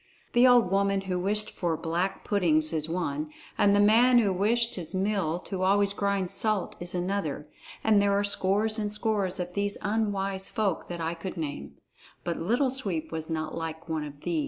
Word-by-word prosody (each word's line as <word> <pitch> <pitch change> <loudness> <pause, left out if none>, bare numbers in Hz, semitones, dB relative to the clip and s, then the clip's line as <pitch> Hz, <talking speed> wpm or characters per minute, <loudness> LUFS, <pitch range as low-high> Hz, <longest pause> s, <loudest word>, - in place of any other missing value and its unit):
The 240 +2 +6
old 240 -6 +5
woman 195 0 +2
who 185 -2 -2
wished 210 +3 0
for 170 -3 -2
black 175 +5 -2
puddings 160 -6 +2
is 155 0 -1
one, 155 -3 -2 0.3
and 200 0 +4
the - - +4
man 235 +5 +5
who 205 -5 +3
wished 230 +5 +1
his 175 -1 -4
mill 190 -4 0
to 190 -1 -5
always 200 +1 +3
grind 200 -2 -1
salt 215 -4 -1
is 175 +1 -5
another. 175 -5 -2 0.4
And 215 -2 +4
there 200 0 +2
are 200 - +1
scores 205 +2 +1
and 210 -1 -2
scores 210 -4 -1
of 180 0 -4
these 200 +1 -1
unwise 200 -3 -1
folk 210 -7 -1
that 175 -1 -5
I 165 +1 -1
could 175 +2 -7
name. 150 -3 -5 0.5
But 170 -1 -2
Little 245 - +1
Sweep 190 -12 -2
was 160 0 -5
not 160 -1 -3
like 165 0 -5
one 160 -2 -2
of 145 -1 -9
these. 330 - -1
195 Hz, 190 wpm, -28 LUFS, 170-205 Hz, 0.5 s, The